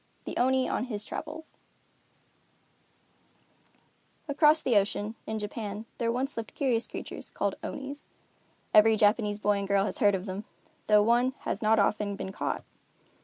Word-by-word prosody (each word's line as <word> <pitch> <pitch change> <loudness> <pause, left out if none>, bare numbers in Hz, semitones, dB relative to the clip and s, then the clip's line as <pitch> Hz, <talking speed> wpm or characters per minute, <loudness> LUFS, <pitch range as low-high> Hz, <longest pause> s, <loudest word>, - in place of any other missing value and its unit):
THE - - -5
ONI 260 +1 +2
ON - - -1
HIS 215 -4 -5
TRAVELS 315 +1 -7 2.7
Across 305 +2 +4
the 245 - +2
ocean, 205 +1 +1
in 220 - -2
Japan, 210 0 -5
there 230 -1 +1
once 265 +4 -2
lived 225 -1 -6
curious 245 -5 +1
creatures - - -7
called - - -1
Onis. 280 +1 -6 0.7
Every 220 +1 +7
Japanese 210 0 +3
boy 205 -1 +1
and 200 - -3
girl 200 0 +3
has - - -3
heard 205 -5 +4
of 185 0 -4
them, 195 +1 -5 0.4
though 210 -1 +6
one 240 +4 +3
has 200 - -3
not 220 0 +4
often 205 0 +1
been 190 - -5
caught. - - -3
220 Hz, 150 wpm, -29 LUFS, 205-255 Hz, 2.7 s, Every